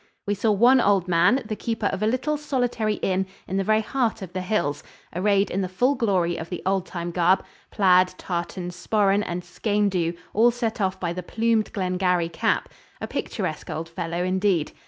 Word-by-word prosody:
We 205 - 0
saw 210 +2 +1
one 240 +5 +5
old 195 -4 +2
man, 180 +10 +3
the 215 0 -3
keeper 225 -1 -3
of 195 0 -1
a 215 - +2
little 255 +6 0
solitary 245 -7 -1
inn 190 0 +1 0.2
in 190 - -2
the 195 - +1
very 215 +2 +3
heart 230 -4 -1
of 180 -1 -9
the 185 - -2
hills, 180 -7 -1 0.3
arrayed 200 +2 +2
in 195 - -1
the 185 - -2
full 245 +9 +2
glory 190 -9 +1
of 160 0 -6
the 180 - -5
old 190 -1 0
time 175 -1 -4
garb 180 +2 +2 0.2
plaid, 185 -2 +4
tartan, 175 0 -4
sporran 200 +2 +1
and 175 -1 -4
skene 205 +3 0
dhu, 170 -2 0 0.2
all 230 +3 +5
set 230 -2 -2
off 190 -1 0
by 170 -2 -2
the 180 - -4
plumed 225 +3 0
Glengarry 180 -3 0
cap 165 - 0 0.3
a - - -4
picturesque - - -4
old 165 +1 -4
fellow 170 0 -3
indeed. 185 -3 +1
195 Hz, 195 wpm, -24 LUFS, 180-220 Hz, 0.3 s, one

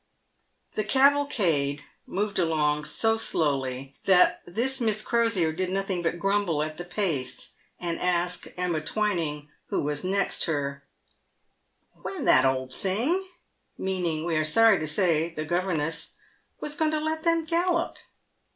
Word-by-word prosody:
The 215 - -1
cavalcade 210 - +2 0.2
moved 205 +1 -2
along 150 -3 +1
so 225 +6 +2
slowly 135 - -1
that 185 -2 +5
this 250 +8 -1
Miss 215 -2 +1
Crosier 230 -9 +2
did 185 +2 -2
nothing 195 -1 -1
but 170 0 -1
grumble 195 -5 +1
at 155 0 -6
the 175 - -5
pace, 175 -8 -3 0.3
and 170 -1 -3
ask 180 0 0
Emma 175 -3 -1
Twining, 160 -6 -1 0.2
who - - -1
was 145 0 -2
next 195 +1 0
her, 140 -3 -2 0.6
" - - -46
When - - -5
that - - +6
old 130 -1 0
thing" 255 - 0 0.2
— - - -47 0.2
meaning, 175 -4 -1
we 170 -2 0
are 155 - +2
sorry 210 +6 +5
to 155 - -3
say, 165 0 +1
the 155 - -3
governess 165 -2 -1
— - - -35
" - - -45
was 295 - -2
going 315 0 +1
to 310 0 0
let 315 +1 -2
them 330 -1 +1
gallop 340 +1 0
180 Hz, 150 wpm, -26 LUFS, 155-215 Hz, 0.6 s, that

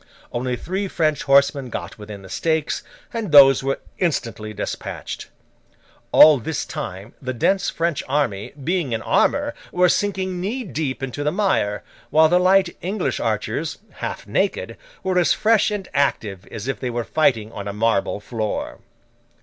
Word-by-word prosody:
Only 125 +1 -1
three 190 - -3
French 155 -5 0
horsemen 140 -1 +3
got 110 - -6
within 105 -2 -9
the - - -11
stakes, 160 - 0 0.3
and 225 -7 -3
those 135 -3 +8
were 135 0 -1 0.2
instantly 115 - -1
despatched. 105 - -5 0.8
All 155 -3 +8
this 150 +6 -3
time 105 - -6
the 130 -1 -4
dense 195 - +2
French 165 -3 -1
army, 125 -9 0
being 170 -5 0
in 110 - -2
armour, 290 +1 +2 0.2
were 180 0 +4
sinking 190 -3 -1
knee 235 +8 -2
deep 145 - -3
into 135 +2 -3
the 150 - +1
mire; 180 - 0 0.3
while 155 0 +5
the 180 +2 +4
light 185 0 +3
English 195 +5 -2
archers, - - -2
half - - -5
naked, - - -1 0.3
were 185 -1 +2
as 175 - +4
fresh 220 -1 +3
and 205 -3 -4
active 105 -9 0
as 110 +3 -7
if 135 - -2
they 125 - -3
were 120 0 -2
fighting 115 -7 +1
on 100 -2 -6
a - - -2
marble 105 -1 0
floor. 110 0 -4
145 Hz, 160 wpm, -22 LUFS, 115-180 Hz, 0.8 s, those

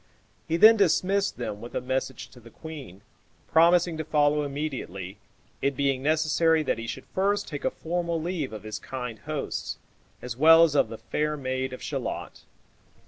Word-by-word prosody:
He 165 - 0
then 220 +5 +8
dismissed 195 +1 +2
them 105 -4 -5
with 120 - -9
a - - +1
message 130 +1 -3
to 125 - -16
the 115 0 -15
queen, 140 - -10 0.5
promising 170 0 +4
to - - -1
follow 150 -1 +2
immediately, 135 - -5 0.4
it 140 -1 0
being 135 -2 +1
necessary 155 +2 +2
that 125 - -1
he 115 - -6
should - - -6
first 205 +2 +1
take 145 -4 -6
a - - +3
formal 170 0 -2
leave 165 -5 -3
of 110 -2 -8
his 110 -1 -5
kind 125 -4 -6
hosts, - - -4 0.4
as 125 -2 -6
well 165 +5 +7
as 160 -3 +3
of 140 -6 +3
the 115 - -7
fair 150 +4 -2
maid 130 -1 -2
of 130 - -8
Shalott. - - -5
145 Hz, 175 wpm, -26 LUFS, 125-165 Hz, 0.5 s, then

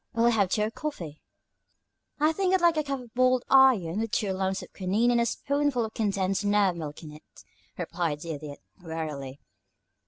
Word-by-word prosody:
Will 230 +1 +2
you - - +3
have 205 -5 +2
tea 210 - +1
or 215 - -1
coffee?" 175 - -6 1.0
"I 305 +2 +4
think 380 +1 +1
I'd - - +2
like 340 -1 +4
a 305 - 0
cup 275 -2 -3
of 235 -2 -15
boiled 255 0 +3
iron, 230 -10 +5
with 225 0 -2
two 205 -3 -1
lumps 190 0 -2
of - - -14
quinine 210 +6 +1
and 235 -1 +3
a 235 - +1
spoonful 280 -1 0
of 220 - -8
condensed 195 -2 -1
nerve 205 -3 +2
milk 155 -1 -7
in 155 - -9
it," 150 +1 -16 0.3
replied 165 -4 -2
the 165 - -5
Idiot, 145 -1 -8 0.2
wearily. 150 -5 -5
205 Hz, 195 wpm, -27 LUFS, 165-255 Hz, 1.0 s, iron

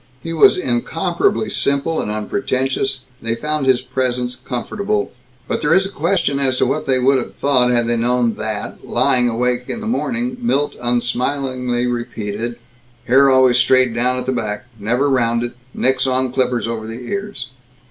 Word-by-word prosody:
He 165 - -4
was 160 - +6
incomparably 160 - 0
simple 140 +4 0
and - - -4
unpretentious; 130 +5 -1 0.2
they 115 0 -1
found 150 +2 -2
his 130 -2 +3
presence 125 -1 -1
comfortable. 200 - -3 0.4
But - - -2
there 150 +3 +3
is 190 0 +4
a 195 - -5
question 165 -5 0
as 130 -2 +1
to - - +3
what 135 +4 -1
they 130 -1 +3
would 130 +1 +3
have - - -7
thought 130 -3 +2
had 120 -1 +2
they 120 0 0
known 120 0 +1
that, 110 -1 -5
lying 125 0 +2
awake 125 +1 0
in - - -3
the 225 - -7
morning, 240 +1 -1
Milt 145 - 0
unsmilingly 125 +1 -1
repeated: 120 -2 -3 0.5
"Hair 135 +3 +5
always 130 -2 +5
straight 130 -2 +4
down 125 +2 +1
at 125 - -3
the 130 - 0
back. 105 -4 -3
Never 120 +7 +1
rounded. 120 -3 +1 0.2
Nix 130 +1 +1
on 130 -1 0
clippers 125 -3 0
over 115 -1 -4
the 115 +2 -7
ears. 200 -10 -4
125 Hz, 170 wpm, -19 LUFS, 120-140 Hz, 0.5 s, was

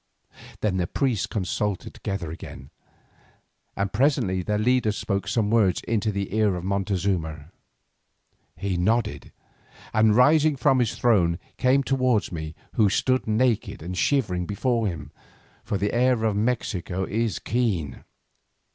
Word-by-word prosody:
Then 100 -4 0
the 90 -2 0
priests 120 - 0
consulted 100 -1 -2
together 95 -5 -4
again, 70 -4 -10 1.0
and 100 0 -2
presently 115 -6 +2
their 105 +3 -1
leader 120 0 +2
spoke 100 -1 -2
some 110 -3 0
words 105 -6 +3
into 110 -1 -1
the 100 -1 -4
ear 105 -3 +2
of 90 - -5
Montezuma. 90 -5 -2 1.1
He 95 -2 -2
nodded, 110 +5 0 0.6
and 110 -1 +4
rising 150 +4 +5
from 135 0 +3
his 120 -4 0
throne, 90 -8 +2 0.2
came 130 +2 +3
towards 130 -5 +1
me 80 -2 -6 0.2
who 105 -3 +3
stood 130 +5 +1
naked 110 -5 0
and 90 +2 -5
shivering 90 -5 0
before 115 +2 0
him, 80 -5 -6 0.5
for 100 - -2
the 100 +2 -1
air 125 -1 +2
of 110 -2 +1
Mexico 100 -5 -1
is 110 +2 -1
keen. 100 - -2
105 Hz, 135 wpm, -25 LUFS, 90-120 Hz, 1.1 s, rising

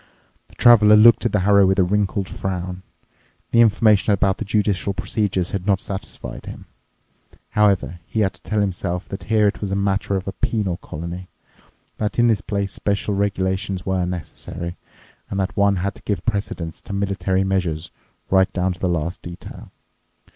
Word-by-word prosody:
The - - -21
Traveler 105 -3 +7
looked 115 +3 +6
at - - -5
the 105 - +1
harrow 100 0 +5
with 95 0 +2
a 95 - +5
wrinkled 100 0 0
frown. 90 -1 -4 0.7
The 115 - +5
information 105 -2 +4
about 95 -1 +2
the 110 - -3
judicial 100 -2 0
procedures 95 -5 -1
had 100 0 -4
not 100 -2 +3
satisfied 95 0 -7
him. - - -9 0.9
However, 100 -5 +2
he 110 - -1
had 95 -2 +1
to - - -20
tell 110 -1 -1
himself 90 -2 -2
that 100 - -6
here 110 -2 +3
it 100 - -2
was 100 - -2
a 95 - -1
matter 100 0 0
of 95 0 -3
a - - -1
penal 100 -6 -1
colony, 85 +4 -7 0.7
that 105 0 -2
in 120 - +4
this 110 -3 +3
place 100 -3 -2
special 100 0 -1
regulations 95 -1 -1
were 95 -2 0
necessary, 85 0 -6 0.5
and 100 - -3
that 95 -1 -2
one 100 0 +3
had 95 +2 -2
to - - -15
give 100 - -3
precedence 100 -6 -3
to - - -8
military 100 -1 0
measures 90 -5 -1 0.4
right 95 0 +4
down 90 0 0
to 90 - -15
the 90 - 0
last 85 0 -2
detail. 85 0 -10
95 Hz, 175 wpm, -21 LUFS, 90-105 Hz, 0.9 s, Traveler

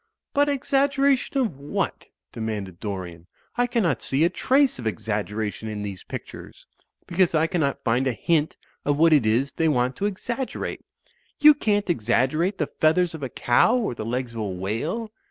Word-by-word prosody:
"But 285 +1 +3
exaggeration 275 0 +1
of 220 - 0
what?" 140 +1 -3 0.2
demanded 105 -6 -5
Dorian. 90 -5 -6 0.3
"I 245 0 +2
cannot 205 - 0
see 135 +4 +1
a 170 - +3
trace 265 - +2
of 115 - -3
exaggeration 105 0 -3
in 105 -1 -4
these 100 -3 -6
pictures; - - -9 0.4
because 180 -1 +2
I 155 +1 +3
cannot 165 -5 -1
find 125 +4 +1
a - - +2
hint 155 +7 0 0.3
of 145 0 +1
what 165 +1 +5
it 135 -8 +4
is 125 +6 +2
they 165 - 0
want 125 -2 +1
to 200 - 0
exaggerate. 235 +6 -4 0.6
You 300 0 +9
can't 210 -7 0
exaggerate 155 - +1
the 155 - 0 0.2
feathers 165 +2 +3
of 160 - -7
a 135 - -3
cow 125 - +3
or 220 - -1
the 110 - -6
legs 120 +1 -3
of 115 - -6
a - - -1
whale. 115 - -3
150 Hz, 175 wpm, -24 LUFS, -, 0.6 s, You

